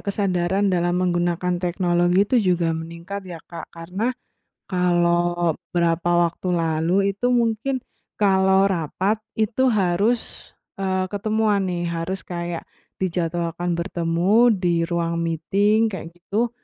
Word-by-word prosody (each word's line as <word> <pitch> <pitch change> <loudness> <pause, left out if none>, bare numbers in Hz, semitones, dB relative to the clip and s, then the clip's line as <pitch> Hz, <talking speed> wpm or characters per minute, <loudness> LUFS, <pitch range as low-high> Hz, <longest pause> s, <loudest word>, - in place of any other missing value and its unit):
kesadaran 195 -1 0
dalam 175 0 +1
menggunakan 175 0 0
teknologi 175 +1 +2
itu 250 - +1 0.2
juga 165 -1 0
meningkat 170 +4 -6
ya, 170 -2 -7
Kak, 170 - -9
karena 180 +7 -3 0.6
kalau 175 -2 +1 0.2
berapa 170 0 +2
waktu 180 +2 -4
lalu 170 +4 +1
itu 245 +5 0
mungkin 240 +2 +1 0.4
kalau 190 -1 +4
rapat 190 +4 -1 0.2
itu 240 +4 +2
harus, 205 +3 0 0.3
eee, 190 -1 0
ketemuan 215 0 +1
nih, 175 -1 -2
harus 170 +3 -3
kayak 170 -1 -4 0.3
dijadwalkan 175 -1 -1
bertemu 180 +6 +2
di 175 -4 +1
ruang 170 -1 -1
meeting 200 +7 +2
kayak 165 -3 -6
gitu, 215 +7 -1
180 Hz, 115 wpm, -22 LUFS, 170-200 Hz, 0.6 s, kalau